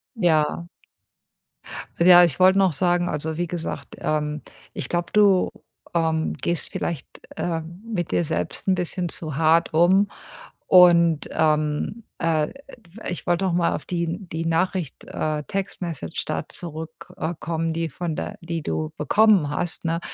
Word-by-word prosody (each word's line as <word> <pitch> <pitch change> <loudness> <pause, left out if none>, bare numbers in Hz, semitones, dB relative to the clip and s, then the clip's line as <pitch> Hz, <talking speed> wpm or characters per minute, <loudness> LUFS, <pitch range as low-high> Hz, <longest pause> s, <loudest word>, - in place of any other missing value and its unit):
Ja.r 170 -3 +1 1.3
Ja, 175 +1 +8
ich 170 -3 +1
wollte 190 +1 +6
noch 190 -4 +3
sagen 175 +3 +1
also, 155 +1 -3
wie 175 0 -1
gesagt, 165 -1 -5
ähm, 150 -1 -1 0.3
ich 125 - -5
glaube, 175 0 -2
du, 200 -3 +4 0.4
ähm, 160 -1 0
gehst 170 -2 -1
vielleicht, 165 -6 -3 0.3
ähm, 170 +1 -4
mit 195 -8 -3
dir - - +2
selbst 90 - -3
'n 190 - +4
bisschen 180 0 -2
zu 155 -4 -5
hart 160 +2 +3
um. 185 +5 +4 0.6
Und, 170 -3 +6
ähm, 155 +7 0 0.2
äh, 165 -2 +1
ä - - -14
f 210 -7 -15
ich 175 - -5
wollte 175 +2 +1
noch 185 - 0
mal 170 -1 +2
auf - - -7
die 170 -1 -2
die 165 0 -4
Nachricht, 165 -1 -1
äh, 155 -1 -2
Text 195 -1 -4
Message 160 - -4
da - - -3
zurück, 160 -1 -8
äh, 160 +2 -2
kommen, 165 0 -2
die 165 0 -2
von 165 +2 -4
der 210 - -5
die 165 -2 -4
du 155 +1 -2
bekommen 195 +1 +4
hast, 170 +4 -3
ne? 165 0 0
170 Hz, 160 wpm, -23 LUFS, 160-180 Hz, 1.3 s, Ja